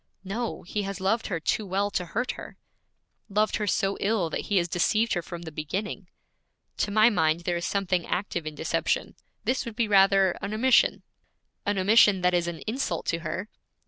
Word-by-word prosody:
'No, 220 Hz, +5 st, -4 dB
he 205 Hz, +4 st, -3 dB
has 195 Hz, -1 st, -4 dB
loved 200 Hz, +5 st, 0 dB
her 175 Hz, -4 st, -2 dB
too 215 Hz, -, 0 dB
well 200 Hz, +1 st, -1 dB
to 180 Hz, -, -1 dB
hurt 235 Hz, +9 st, -2 dB
her.' -, -, -10 dB, 0.7 s
'Loved 210 Hz, +1 st, +1 dB
her 210 Hz, -, -2 dB
so 195 Hz, 0 st, 0 dB
ill 195 Hz, -5 st, 0 dB
that -, -, -3 dB
he 205 Hz, -, +1 dB
has 175 Hz, -1 st, +2 dB
deceived 215 Hz, +6 st, +1 dB
her 175 Hz, -, 0 dB
from 170 Hz, 0 st, -8 dB
the 160 Hz, -, -7 dB
beginning.' 185 Hz, +6 st, -4 dB, 0.7 s
'To -, -, 0 dB
my 215 Hz, +3 st, +5 dB
mind 160 Hz, -4 st, +2 dB
there 175 Hz, 0 st, -1 dB
is 170 Hz, -, -3 dB
something 185 Hz, -3 st, 0 dB
active 175 Hz, -4 st, -2 dB
in 155 Hz, -, -5 dB
deception; -, -, -1 dB, 0.3 s
this 255 Hz, -, 0 dB
would 230 Hz, -2 st, -7 dB
be 230 Hz, -1 st, +1 dB
rather 195 Hz, -2 st, +5 dB
an 200 Hz, +2 st, -3 dB
omission.' 255 Hz, +3 st, +3 dB, 0.6 s
'An 205 Hz, 0 st, +1 dB
omission 200 Hz, 0 st, +5 dB
that 180 Hz, 0 st, +2 dB
is 175 Hz, -1 st, +1 dB
an 170 Hz, -1 st, -5 dB
insult 255 Hz, +6 st, -2 dB
to 165 Hz, -, 0 dB
her.' 170 Hz, +5 st, -4 dB
195 Hz, 195 wpm, -27 LUFS, 175-215 Hz, 0.7 s, my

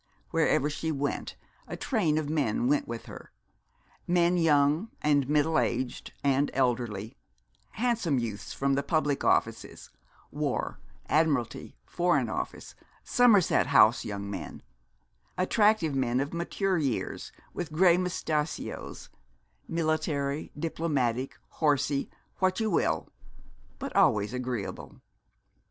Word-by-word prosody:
Wherever 145 Hz, -, +2 dB
she 160 Hz, +2 st, -3 dB
went, 145 Hz, -1 st, -3 dB, 0.3 s
a -, -, -6 dB
train 175 Hz, -, 0 dB
of 155 Hz, -2 st, -1 dB
men 160 Hz, -, 0 dB
went 290 Hz, +1 st, +1 dB
with -, -, -6 dB
her; -, -, -11 dB, 0.8 s
men 175 Hz, 0 st, +3 dB
young 155 Hz, +3 st, +3 dB
and 145 Hz, -3 st, +2 dB
middle 150 Hz, +2 st, +3 dB
aged 125 Hz, +1 st, -2 dB
and 140 Hz, +1 st, +2 dB
elderly; 120 Hz, -5 st, -1 dB, 0.6 s
handsome 225 Hz, -, 0 dB
youths 110 Hz, -4 st, -4 dB
from 140 Hz, 0 st, 0 dB
the 140 Hz, -, +1 dB
public 150 Hz, -2 st, 0 dB
offices; -, -, 0 dB, 0.4 s
War, -, -, -2 dB, 0.3 s
Admiralty, 150 Hz, -7 st, 0 dB
Foreign 170 Hz, -9 st, +1 dB
Office, -, -, -5 dB, 0.3 s
Somerset 220 Hz, -, +4 dB
House 120 Hz, -4 st, +5 dB
young 100 Hz, -1 st, -5 dB
men; 95 Hz, -5 st, -7 dB, 0.7 s
attractive 205 Hz, -3 st, +3 dB
men 130 Hz, -2 st, +1 dB
of 140 Hz, +3 st, -2 dB
mature 180 Hz, +2 st, -1 dB
years, 135 Hz, -7 st, -3 dB, 0.2 s
with 170 Hz, -3 st, -5 dB
grey 170 Hz, +2 st, +5 dB
moustachios, 160 Hz, -4 st, -3 dB, 0.6 s
military, 155 Hz, -3 st, -1 dB
diplomatic, 140 Hz, -6 st, -1 dB, 0.2 s
horsey, 145 Hz, -2 st, +1 dB, 0.3 s
what 185 Hz, +1 st, +1 dB
you 220 Hz, -1 st, 0 dB
will, -, -, +1 dB, 0.7 s
but -, -, -6 dB
always 105 Hz, +2 st, +3 dB
agreeable. 125 Hz, -5 st, -5 dB
150 Hz, 110 wpm, -28 LUFS, 130-170 Hz, 0.8 s, House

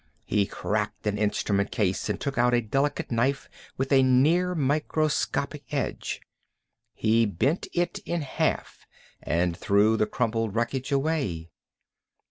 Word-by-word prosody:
He 100 Hz, -2 st, +1 dB
cracked -, -, -3 dB
an 105 Hz, -1 st, 0 dB
instrument 100 Hz, -1 st, 0 dB
case 95 Hz, -3 st, -1 dB
and -, -, -1 dB
took 140 Hz, -, -3 dB
out 120 Hz, +1 st, +3 dB
a 120 Hz, -, +3 dB
delicate 135 Hz, +7 st, -1 dB
knife 125 Hz, +4 st, 0 dB, 0.3 s
with 135 Hz, +1 st, -2 dB
a 135 Hz, -1 st, +6 dB
near 155 Hz, +8 st, +3 dB
microscopic 150 Hz, 0 st, -1 dB
edge. -, -, -3 dB, 0.7 s
He 115 Hz, +1 st, +3 dB
bent 130 Hz, -, 0 dB
it 175 Hz, +3 st, -1 dB
in 175 Hz, -4 st, -3 dB
half 135 Hz, -, -2 dB, 0.3 s
and 85 Hz, 0 st, 0 dB
threw 105 Hz, +5 st, +3 dB
the 110 Hz, -, +2 dB
crumpled 115 Hz, -2 st, -1 dB
wreckage 125 Hz, +4 st, -1 dB
away. 135 Hz, -, -1 dB
125 Hz, 130 wpm, -26 LUFS, 105-145 Hz, 0.7 s, a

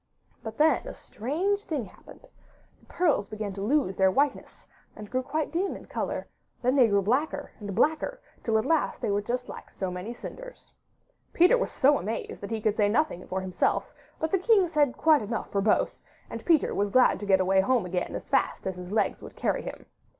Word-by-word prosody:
But 220 Hz, 0 st, -7 dB
then 315 Hz, +1 st, +3 dB
a -, -, -7 dB
strange 365 Hz, -, -2 dB
thing 285 Hz, -8 st, -2 dB
happened: -, -, -16 dB, 0.5 s
the -, -, -26 dB
pearls 320 Hz, -, +1 dB
began 215 Hz, -2 st, -4 dB
to 195 Hz, -, -6 dB
lose 220 Hz, -3 st, +1 dB
their 190 Hz, 0 st, +5 dB
whiteness 280 Hz, +9 st, -1 dB, 0.3 s
and 210 Hz, -, -9 dB
grew 255 Hz, +1 st, 0 dB
quite 290 Hz, +4 st, -2 dB
dim 370 Hz, +4 st, -1 dB
in -, -, -13 dB
colour; -, -, -4 dB, 0.4 s
then 250 Hz, +2 st, +2 dB
they 255 Hz, -4 st, +6 dB
grew 200 Hz, -2 st, +2 dB
blacker 285 Hz, +7 st, -1 dB
and 205 Hz, -3 st, -6 dB
blacker 315 Hz, -, +1 dB, 0.2 s
till 225 Hz, -1 st, +1 dB
at 220 Hz, -, 0 dB
last 325 Hz, -2 st, +1 dB
they -, -, -1 dB
were 200 Hz, +1 st, +1 dB
just 245 Hz, +4 st, -3 dB
like -, -, -9 dB
so 190 Hz, -2 st, -4 dB
many 180 Hz, +5 st, -5 dB
cinders. -, -, -10 dB, 0.6 s
Peter 360 Hz, +8 st, +6 dB
was -, -, -1 dB
so 285 Hz, +1 st, +3 dB
amazed 215 Hz, +5 st, -5 dB
that 200 Hz, -, -6 dB
he 225 Hz, -1 st, -3 dB
could 215 Hz, -1 st, +1 dB
say 210 Hz, -2 st, +3 dB
nothing 235 Hz, -, 0 dB
for 190 Hz, 0 st, -2 dB
himself, 185 Hz, -1 st, -1 dB, 0.2 s
but 320 Hz, 0 st, -2 dB
the 385 Hz, -, +2 dB
king 395 Hz, -1 st, +4 dB
said 295 Hz, -5 st, +1 dB
quite 310 Hz, -4 st, +4 dB
enough 220 Hz, +2 st, -4 dB
for 200 Hz, -, +1 dB
both, 210 Hz, +1 st, +1 dB, 0.3 s
and -, -, -7 dB
Peter 330 Hz, -4 st, +3 dB
was 205 Hz, 0 st, 0 dB
glad 255 Hz, +5 st, +4 dB
to 205 Hz, -, -6 dB
get 190 Hz, -1 st, +5 dB
away 190 Hz, +1 st, +3 dB
home 240 Hz, -1 st, +1 dB
again 180 Hz, 0 st, -3 dB
as -, -, -6 dB
fast -, -, 0 dB
as 190 Hz, -1 st, -3 dB
his 180 Hz, +1 st, -8 dB
legs 215 Hz, -, 0 dB
would -, -, -11 dB
carry -, -, -1 dB
him. -, -, -8 dB
235 Hz, 210 wpm, -27 LUFS, 200-310 Hz, 0.6 s, they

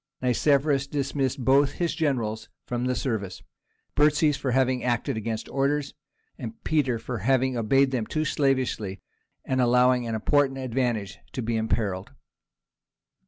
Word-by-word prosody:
Nicephorus 140 Hz, +2 st, +2 dB
dismissed 140 Hz, -2 st, -2 dB
both 140 Hz, +2 st, +4 dB
his 170 Hz, -2 st, -1 dB
generals 115 Hz, -7 st, -1 dB, 0.2 s
from 120 Hz, 0 st, -2 dB
the 125 Hz, 0 st, 0 dB
service—Burtzes 140 Hz, -, -1 dB
for 135 Hz, -, -3 dB
having 130 Hz, 0 st, +1 dB
acted 120 Hz, -2 st, 0 dB
against 110 Hz, 0 st, -4 dB
orders, 140 Hz, +1 st, 0 dB, 0.7 s
Peter 140 Hz, -6 st, +1 dB
for 115 Hz, +1 st, -5 dB
having 130 Hz, +4 st, +1 dB
obeyed 135 Hz, +4 st, +3 dB
them 120 Hz, -4 st, -1 dB
too 155 Hz, 0 st, -1 dB
slavishly, 130 Hz, -9 st, 0 dB, 0.5 s
and 130 Hz, -1 st, +1 dB
allowing 125 Hz, 0 st, +3 dB
an 115 Hz, -, -2 dB
important 135 Hz, +4 st, +2 dB
advantage 120 Hz, -5 st, -2 dB
to 130 Hz, -, -3 dB
be 115 Hz, +1 st, -1 dB
imperilled. 105 Hz, -4 st, -2 dB
130 Hz, 125 wpm, -26 LUFS, 115-140 Hz, 0.7 s, both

